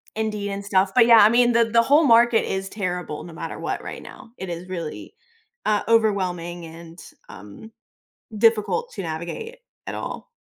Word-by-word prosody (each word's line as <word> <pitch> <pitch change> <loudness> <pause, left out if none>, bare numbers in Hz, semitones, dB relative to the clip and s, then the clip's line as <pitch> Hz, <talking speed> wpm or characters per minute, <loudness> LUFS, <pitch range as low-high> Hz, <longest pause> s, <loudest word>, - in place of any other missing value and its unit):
Indeed, 210 -2 -3
and 200 0 -5
stuff, 190 -1 +2
but 240 -2 +6
yeah, 235 -1 +7
I 210 - +7
mean, 240 +1 +4
the 235 -1 +3
the 230 +1 +3
whole 290 +6 +4
market 235 -2 +4
is 190 0 -3
terrible 180 -6 -4
no 170 - -11
matter - - -7
what - - -4
right - - -7
now, 250 -3 -13
it 190 - -7
is 175 +1 -6
really, 170 -4 -7 0.5
uh, 210 -1 +1
overwhelming 180 -6 0
and, 165 +1 -12 0.3
um, 105 - -12 0.7
difficult 225 - +1
to 195 - -5
navigate, 170 - -6 0.3
at - - -5
all. - - -6
200 Hz, 175 wpm, -23 LUFS, 175-230 Hz, 0.7 s, yeah